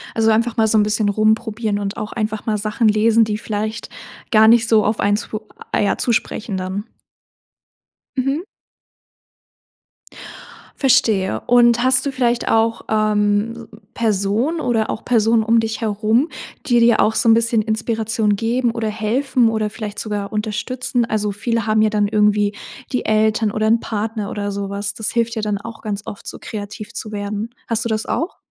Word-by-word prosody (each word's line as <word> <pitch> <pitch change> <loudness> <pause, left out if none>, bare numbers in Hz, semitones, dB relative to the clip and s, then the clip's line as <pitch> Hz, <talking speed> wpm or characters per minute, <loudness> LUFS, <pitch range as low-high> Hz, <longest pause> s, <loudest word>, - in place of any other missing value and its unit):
Also 225 0 +3
einfach 230 +1 +1
mal 220 -1 +3
so 220 - +3
'n 210 - +5
bisschen 210 0 +1
rumprobieren 215 0 0
und 200 0 -4
auch 210 - -5
einfach 215 -1 -3
mal 215 -2 0
Sachen 215 +2 0
lesen, 220 +2 +4
die 210 -1 -1
vielleicht 215 0 -4 0.4
gar 220 -2 +6
nicht 225 0 +5
so 220 -2 +4
auf 210 0 0
einen 205 +1 +2
zu 215 -1 -5 0.3
ah, - - +1
ja 205 - +1
zu 245 - 0
sprechen 215 -2 -2
dann. 190 +2 -4 1.3
Mhm. 275 +5 0 2.3
Verstehe. 200 - +2
Und 240 0 +5
hast 260 +1 +3
du 280 - -1
vielleicht 240 -2 0
auch, 225 0 +1
ähm, 215 +1 0 0.3
Personen 220 - 0
oder 225 -5 0
auch 220 - -4
Personen 225 -1 +3
um 230 +1 +3
dich 225 0 -3
herum, 220 +6 +1 0.4
die 240 -3 +3
dir 235 0 +4
auch 220 - +2
so 230 - +3
'n - - +8
bisschen 230 0 +2
Inspiration 220 -1 0
geben 235 +3 0
oder 225 -1 -3
helfen 230 +3 +1
oder 220 -1 -1
vielleicht 210 -1 -6
sogar 205 -2 -4
unterstützen? 235 +3 -2
Also, 215 -2 -1
viele 230 +2 -2
haben 215 0 +3
ja 215 - +4
dann 210 -1 +1
irgendwie 210 -1 +2 0.4
die 250 - -1
Eltern 215 0 +2
oder 215 +1 0
'n 230 +1 +4
Partner 215 -1 -3
oder 205 -1 -3
so 200 0 -4
was. 200 0 -3
Das 220 - -2
hilft 235 0 0
ja 220 - -2
dann 210 -1 -1
auch 225 +2 -9
ganz 205 -2 -4
oft, 205 - -9
so - - -6
kreativ 210 0 -7
zu 215 - -6
werden. 205 +1 -4 0.2
Hast 230 0 -1
du - - -1
das 220 0 -1
auch? 335 +4 -2
220 Hz, 175 wpm, -19 LUFS, 210-230 Hz, 2.3 s, n